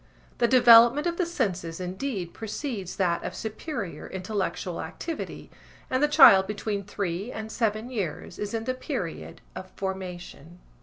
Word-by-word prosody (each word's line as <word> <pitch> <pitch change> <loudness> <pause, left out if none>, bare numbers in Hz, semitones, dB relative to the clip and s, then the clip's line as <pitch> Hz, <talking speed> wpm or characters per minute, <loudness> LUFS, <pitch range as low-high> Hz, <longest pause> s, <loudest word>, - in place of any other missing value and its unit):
The 235 - +4
development 240 +3 +7
of 340 -1 -1
the 360 - 0
senses 185 - -2
indeed 185 0 -4
precedes 220 - -5
that 175 -3 0
of - - -5
superior 220 - -5
intellectual 190 -2 -3
activity 320 - -6 0.4
and 255 +1 +1
the 295 - +5
child 270 -11 +8
between 205 0 -3
three 200 +2 -4
and 220 -1 -6
seven 220 +1 -1
years 195 -11 -4
is 210 +2 -3
in 225 - -2
the 255 +2 -1
period 255 - -5
of 185 - -8
formation. 180 -3 -6
210 Hz, 145 wpm, -26 LUFS, 185-250 Hz, 0.4 s, child